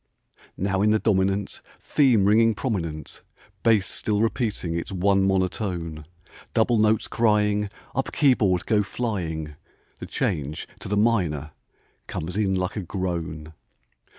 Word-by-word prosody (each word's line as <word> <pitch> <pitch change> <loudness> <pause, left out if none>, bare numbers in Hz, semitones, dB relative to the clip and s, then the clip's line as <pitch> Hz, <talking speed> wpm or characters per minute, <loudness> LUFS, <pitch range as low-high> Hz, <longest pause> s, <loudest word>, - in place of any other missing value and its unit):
Now 95 0 0
in 105 - +4
the 110 - +4
dominant 100 -2 0 0.2
Theme 125 -9 +3
ringing 110 +2 +4
prominent, 85 - -4 0.4
Bass 110 -4 +4
still 105 -1 -1
repeating 110 -6 -1
its 85 +4 -4
one 95 +1 +2
monotone, 90 -5 -1 0.5
Double 115 0 +3
notes 110 0 +3
crying, 105 -2 +2 0.2
Up 135 - -2
keyboard 105 - +3
go 105 -2 +3
flying, 85 -9 -3 0.4
The - - -7
change 75 +1 -2
to - - -7
the 105 +1 0
minor 90 - +1 0.6
comes 85 +3 -5
in 100 -2 +1
like 90 0 -2
a 105 - -2
groan. 85 -4 -4
100 Hz, 125 wpm, -25 LUFS, 85-110 Hz, 0.6 s, in